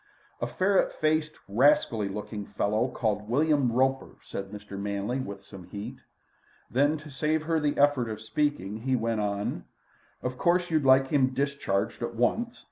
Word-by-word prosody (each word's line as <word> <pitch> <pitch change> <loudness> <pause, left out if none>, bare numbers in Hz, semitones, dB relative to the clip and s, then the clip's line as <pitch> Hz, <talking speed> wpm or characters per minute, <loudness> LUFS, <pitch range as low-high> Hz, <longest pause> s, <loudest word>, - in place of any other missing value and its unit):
"A - - 0
ferret 190 +1 +2
faced, 155 0 +1
rascally 110 -2 +3
looking 105 0 -5
fellow, 110 +4 0
called 105 -4 -2
William 145 -1 +3
Roper," 130 +2 +1
said 95 0 -6
Mr. 105 0 -10
Manley 100 +5 -2
with 100 -5 -6
some 95 -3 -11
heat. 100 +3 -7 0.7
Then, 145 +5 +3
to 155 0 -11
save 155 +3 0
her 160 0 +1
the 145 -1 0
effort 140 -5 +3
of 110 -1 -5
speaking, 110 -2 -1
he 130 +3 0
went 115 -2 0
on: 100 0 -2 0.6
"Of 125 0 -3
course 175 0 +2
you'd 155 -3 +2
like 130 0 +6
him 130 -3 +2
discharged 140 -10 -1
at 120 0 -3
once. 230 - 0
130 Hz, 160 wpm, -28 LUFS, 105-150 Hz, 0.7 s, like